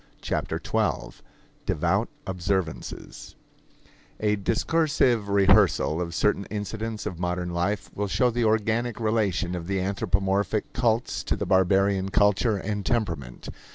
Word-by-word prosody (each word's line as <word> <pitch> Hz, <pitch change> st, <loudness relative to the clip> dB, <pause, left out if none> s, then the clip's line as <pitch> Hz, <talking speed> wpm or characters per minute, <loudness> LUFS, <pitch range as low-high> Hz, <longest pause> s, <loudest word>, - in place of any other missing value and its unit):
Chapter -, -, -2 dB
Twelve -, -, -2 dB, 0.2 s
~~ -, -, -34 dB
Devout -, -, +1 dB, 0.2 s
Observances 95 Hz, -2 st, -4 dB, 0.8 s
A 105 Hz, -1 st, +2 dB
discoursive 120 Hz, -, +1 dB
rehearsal 95 Hz, -4 st, +4 dB
of 85 Hz, -1 st, -4 dB
certain 100 Hz, 0 st, +1 dB
incidents 110 Hz, +1 st, -4 dB
of 85 Hz, -, -5 dB
modern 90 Hz, 0 st, -2 dB
life 90 Hz, +5 st, -1 dB
will 105 Hz, 0 st, -2 dB
show 125 Hz, +5 st, +2 dB
the 120 Hz, +1 st, 0 dB
organic 110 Hz, +2 st, +1 dB
relation 105 Hz, -5 st, 0 dB
of 85 Hz, -2 st, -5 dB
the 95 Hz, 0 st, 0 dB
anthropomorphic 100 Hz, +1 st, 0 dB
cults 115 Hz, -1 st, 0 dB
to -, -, 0 dB
the -, -, -3 dB
barbarian 95 Hz, +1 st, +3 dB
culture 105 Hz, +2 st, +3 dB
and 105 Hz, +1 st, -3 dB
temperament. 85 Hz, -, -2 dB
100 Hz, 125 wpm, -26 LUFS, 95-110 Hz, 0.8 s, rehearsal